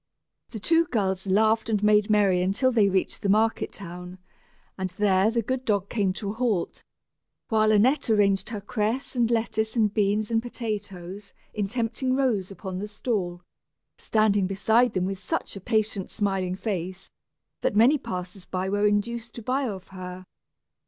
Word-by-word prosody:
The 225 - -7
two 330 +9 +3
girls 195 - -1
laughed 220 +3 +3
and 210 -2 0
made 210 0 +4
merry 200 -4 +3
until 200 +8 +2
they 215 -5 +4
reached 190 -1 -1
the 200 - -1
market 220 +3 +2
town, 180 -1 -8 0.6
and 190 -1 -3
there 190 +1 +2
the 230 0 0
good 260 +3 -2
dog 200 -4 0
came 200 -5 +1
to 200 0 -4
a - - -5
halt, 220 -6 -1 0.7
while 215 -1 +3
Annette 240 +7 +3
arranged 200 -2 +3
her 215 -3 -5
cress 220 +6 -2
and 235 -2 +2
lettuces 220 -1 0
and 215 -3 +2
beans 210 +1 +1
and 225 0 +2
potatoes 205 -5 -6 0.2
in 205 -2 -1
tempting 240 +3 -1
rows 235 -9 +1
upon 190 -1 -6
the 205 - -4
stall 200 -5 -3 0.6
standing 205 -3 +2
beside 220 +5 +2
them 185 -1 0
with 195 0 -3
such - - -3
a 195 - -7
patient 215 -2 0
smiling 195 -3 -1
face, 190 -2 -4 0.5
that - - 0
many 250 +8 +5
passers 180 -3 -6
by 185 0 -2
were 205 +1 +2
induced 225 +3 -1
to 235 - -8
buy 260 +3 0
of 195 -4 -7
her. 185 0 -8
210 Hz, 165 wpm, -26 LUFS, 190-225 Hz, 0.7 s, many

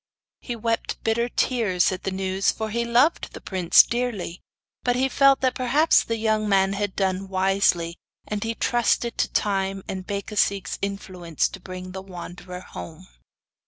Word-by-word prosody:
He 240 - -5
wept 230 0 -2
bitter 235 +2 +1
tears 215 -10 +1
at 185 - -6
the - - +1
news, 190 0 0
for 220 -1 -4
he 235 +2 0
loved 245 +7 +2
the - - -8
prince 185 -3 +5
dearly; 235 -8 -3 0.4
but 245 -1 +1
he 260 +2 +2
felt 275 +1 +4
that 260 -1 +2
perhaps 275 +5 +3
the 230 - -2
young 215 -1 +1
man 195 -1 +3
had 200 -1 -2
done 190 0 -1
wisely, 185 -3 +1 0.3
and 210 -1 -3
he 225 0 -2
trusted 240 -1 +1
to - - +1
time 195 -1 0
and 190 -1 -5
Becasigue's 200 -1 -1
influence 185 -5 -2
to 195 - -10
bring 185 0 -8
the 190 +1 -6
wanderer 180 -1 -9
home. 85 - -10
200 Hz, 160 wpm, -24 LUFS, 185-235 Hz, 0.4 s, prince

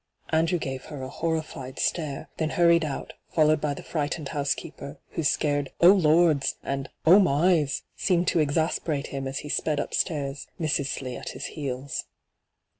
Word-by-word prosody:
Andrew 165 +2 +2
gave 135 -4 -5
her 145 -4 -7
a 130 - -5
horrified 155 -4 -3
stare, 150 -5 -1
then 160 -1 0
hurried 170 0 +4
out, 145 -3 -4 0.2
followed 155 -2 +3
by 145 -1 -1
the - - -9
frightened 150 -1 -3
house 145 -2 0
keeper, 140 +1 -9
whose 155 -3 +1
scared 145 -3 0
' - - -46
Oh 175 +2 +9
Lord's 160 -5 +4
!* - - -41
and 135 0 -3
' - - -48
Oh 180 +5 +8
my's 160 -3 +2
!' - - -46
seemed 180 -2 +1
to 170 - +2
exasperate 155 -1 0
him 135 -1 -3
as 135 0 -4
he - - -6
aped 150 0 0
upstairs, 145 -2 -2
Mrs. 150 -4 0
Slee 130 -3 -4
at - - -6
his - - -6
heels. 135 -2 -4
150 Hz, 185 wpm, -26 LUFS, 140-165 Hz, 0.2 s, Oh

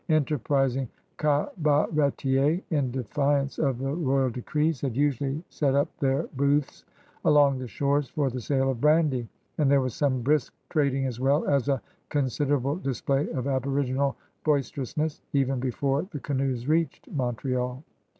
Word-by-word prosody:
Enterprising 135 -4 +1 0.3
cabaretiersy 150 0 +1
in 140 -5 +1
defiance 140 +3 0
of 135 -5 +1
the 135 +2 -2
royal 135 -5 +1
decrees, 150 +5 -1
had 130 -5 -2
usually 140 +2 0
set 140 -3 0
up 140 - +1
their 135 +2 +1
booths 140 +1 +1 0.4
along 145 -4 +4
the 130 - -5
shores 140 +4 0
for 140 -2 0
the 125 0 -4
sale 135 +2 +1
of 120 -3 -6
brandy, 150 -6 +3 0.3
and 145 -3 +3
there 140 0 +5
was 130 -3 -1
some 130 -3 0
brisk 145 0 +1 0.2
trading 140 -4 +1
as 125 -3 -3
well 140 +4 +2
as 140 -1 +2
a 135 -2 +2 0.3
considerable 140 +1 0
display 135 - -1
of 130 -1 -3
aboriginal 135 0 0 0.3
boisterousness 145 +1 -1
even 135 -2 +1
before 135 +3 0
the 150 - -6
canoes 130 -3 -2
r^eached 160 +3 0
Montreal. 125 0 -2
140 Hz, 140 wpm, -27 LUFS, 130-145 Hz, 0.4 s, there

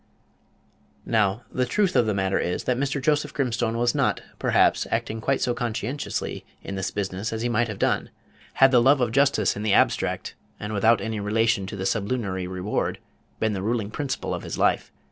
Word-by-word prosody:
Now 110 0 +1
the 125 -1 0
truth 200 -4 +1
of 115 - +4
the 105 - +1
matter 95 0 +1
is, 90 - -2
that 125 - +1
Mr. 140 +2 -1
Joseph 150 +1 0
Grimstone 120 -4 0
was 120 0 +2
not, - - +1 0.2
perhaps, - - +3
acting 110 0 -2
quite 135 +3 0
so 120 - +1
conscientiously 120 +3 -3 0.2
in - - -6
this 95 -1 -2
business 100 +1 -3
as 110 0 -3
he 120 - 0
might 120 +1 +1
have 105 -3 -5
done, - - 0 0.4
had 135 0 +5
the 125 -2 +6
love 135 +3 +5
of 120 -3 +1
justice 130 -6 +2
in 105 - -5
the 105 -2 +1
abstract, - - +1 0.3
and 105 +1 -5
without 110 +3 +3
any 110 -1 -3
relation 110 0 +1
to 95 -2 -5
sublunary 100 -4 -1
reward, 95 +3 -2 0.4
been 110 -1 +1
the 95 - -3
ruling 110 0 -1
principle 135 +2 -3
of - - -3
his - - -5
life. - - +1
115 Hz, 190 wpm, -25 LUFS, 100-125 Hz, 0.4 s, the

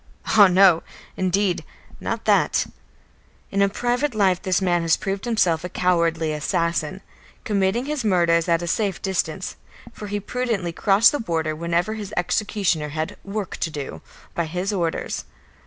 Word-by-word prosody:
Ah, 205 -2 +7
no 185 -2 +5 0.3
indeed; 185 0 0 0.4
not - - -4
that! - - +3 0.9
In 200 0 +3
private 245 +5 -1
life 190 -4 +2
this 185 -1 +1
man 175 -3 +1
has 165 -1 +2
proved 195 -1 -3
himself 180 -9 +1
a 180 - -4
cowardly 170 -3 +1
assassin, 170 +3 -1 0.4
committing 205 +4 0
his 295 -3 -2
murders 170 -5 +3
from 170 - +3
a - - -4
safe 195 +1 0
distance, 185 -2 -2 0.4
for 210 - -8
he 205 0 -2
prudently 215 -5 -2
crossed 200 +6 +4
the 290 - -2
border 160 -6 -1
whenever 170 +5 0
his 210 -2 -6
executioner 175 -4 0
had 155 +2 -3
"work 200 -1 -4
to 165 - -2
do" 145 -3 -6 0.3
by 170 - -1
his 180 +5 -2
orders. 170 -4 -2
185 Hz, 150 wpm, -23 LUFS, 170-205 Hz, 0.9 s, Ah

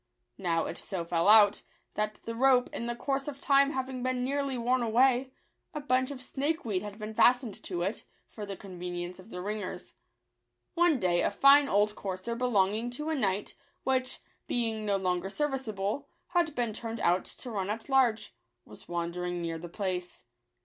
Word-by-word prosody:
Now 170 -3 0
it 170 - -5
so 180 -3 -4
fell 170 +1 +1
out, 210 -1 +7 0.3
that 210 0 -1
the 230 - -4
rope, 250 +1 +4
in 235 - -3
the 240 - -2
course 270 +3 -2
of 280 -2 -5
time 280 0 +4
having 260 -1 -3
been 255 0 0
nearly 275 0 -1
worn 245 +2 +1
away, 250 +3 +3 0.4
a - - -1
bunch 260 -3 +1
of 265 -3 -7
snakeweed 270 - -1
had 210 -1 -7
been 215 0 -6
fastened 245 -1 +3
to 175 -2 -3
it, 200 +5 -2 0.2
for 215 - -9
the 200 -2 -5
con 185 -3 -10
venience 175 0 -5
of 185 +4 -14
the 180 -4 -6
ringers. 205 -2 -5 0.8
One 340 -5 +3
day 175 -3 +2
a - - +2
fine 275 +6 +6
old 205 -1 +2
courser 190 +3 -4
belonging 230 -2 +1
to 300 +1 -3
a 320 - 0
knight, 200 -6 0 0.3
which, 255 -1 0 0.3
being 225 -3 -1
no 200 -1 +2
longer 185 0 -1
serviceable, 265 -2 -2 0.2
had 345 -4 +1
been 235 -3 -1
turned 225 +1 -5
out 180 +2 +2
to 250 - -6
run 195 -3 -2
at 220 +2 -4
large, 260 -5 +2 0.3
was - - -14
wandering 175 +1 -3
near 165 -1 -3
the 175 +1 -8
place. 180 -1 -4
220 Hz, 180 wpm, -30 LUFS, 190-260 Hz, 0.8 s, out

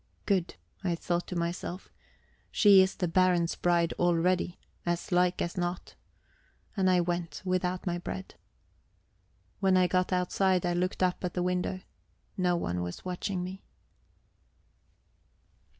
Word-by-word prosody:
Good, 190 -4 0 0.3
I 175 -3 +1
thought 175 +1 -2
to 180 - -5
myself. 175 +2 -4 0.6
She 200 -3 +7
is 190 +1 +1
the 180 - -1
Baron's 175 -1 +3
bride 170 -1 +1
already, 175 +1 +2 0.3
as 175 +1 -2
like 180 0 +2
as 175 - -4
not. 175 0 -3 0.8
And 190 -2 +2
I 180 -1 +4
went, 175 0 -2
without 185 0 -1
my 175 -1 -1
bread. 190 +2 -6 1.3
When 190 -2 +3
I 185 - +5
got 185 +1 +1
outside, 185 0 +1
I 175 - +1
looked 180 +2 -1
up 180 0 0
at 180 - -3
the 180 - 0
window. 180 +1 -1 0.5
No 180 -2 +2
one 90 - -2
was 90 - -6
watching 180 0 -3
me. 190 +2 -7
180 Hz, 135 wpm, -29 LUFS, 175-185 Hz, 1.3 s, She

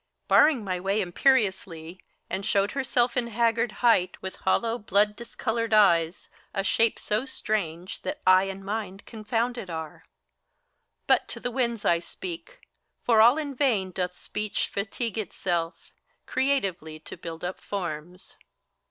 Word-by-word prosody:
Barring 295 -7 +5
my 185 -2 -2
way 195 +3 0
imperiously, 185 -5 +1 0.3
and 190 +2 -3
showed 200 +1 +1
herself 250 -3 +1
In 245 -2 0
haggard 230 0 +1
height, 185 -6 +3
with 190 - -6
hollow, 230 +5 +1
blood 210 +1 +2
discolored 230 -1 -2
eyes, 170 -5 +3 0.3
A 195 - 0
shape 225 +3 +2
so 215 +3 -1
strange 185 -8 -3
that 295 - -4
eye 185 +1 +6
and 195 0 -6
mind 205 -1 -4
confounded 225 -1 -2
are. 160 -2 -6 1.0
But - - +3
to - - -6
the 245 - -3
winds 235 -3 -1
I 170 - +4
speak: 370 - -8 0.4
for 225 -2 +5
all 240 +6 +7
in 295 -3 -3
vain 230 -9 +1
doth 180 0 -3
Speech 210 -1 -3
Fatigue 220 +3 -3
itself, 175 -5 -3 0.3
creatively 195 - -1
to - - -9
build 165 0 -8
up 180 +1 -4
forms. 175 -2 -6
205 Hz, 140 wpm, -27 LUFS, 185-235 Hz, 1.0 s, all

